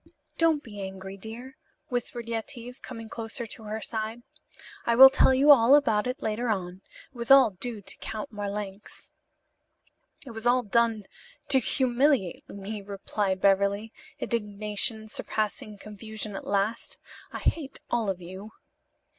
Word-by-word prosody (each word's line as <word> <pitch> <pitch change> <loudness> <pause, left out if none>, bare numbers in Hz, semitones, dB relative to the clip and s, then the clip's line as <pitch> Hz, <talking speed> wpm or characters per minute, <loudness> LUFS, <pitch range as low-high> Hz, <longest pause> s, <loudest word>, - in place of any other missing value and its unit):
"Don't 325 -3 +3
be 205 -3 -9
angry, 190 0 -7
dear," 235 +8 -9 0.3
whispered 240 -1 -3
Yetive, 235 +2 -5
coming 225 -3 -8
close 225 0 -7
to 230 -2 -6
her 215 +1 -4
side. 220 +2 -4 0.6
"I 235 - +2
will 265 +2 +11
tell 265 - +5
you 275 +3 +6
all 260 0 +8
about 225 -7 +3
it 250 +1 -4
later 220 +3 -1
on. 185 -3 -2 0.3
It - - -33
was 235 -1 -5
all 270 -4 +8
due 210 +3 -6
to - - -10
Count 220 0 -6
Marlanx." 205 -1 -6 1.1
"It 255 - -8
was 225 +1 -4
all 250 +1 +4
done 225 0 +2 0.5
to 265 - +5
humiliate 255 - +1
me," 200 +1 -6
replied 195 -1 -2
Beverly, 200 +2 +2 0.2
indignation 215 0 -2
surpassing 215 -1 -3
confusion 215 0 -6
at - - -7
last. 205 +3 -1 0.3
"I - - -5
hate 285 -5 -2
all 230 -4 +1
of 190 -2 -2
you." 190 +5 -9
220 Hz, 145 wpm, -27 LUFS, 205-240 Hz, 1.1 s, will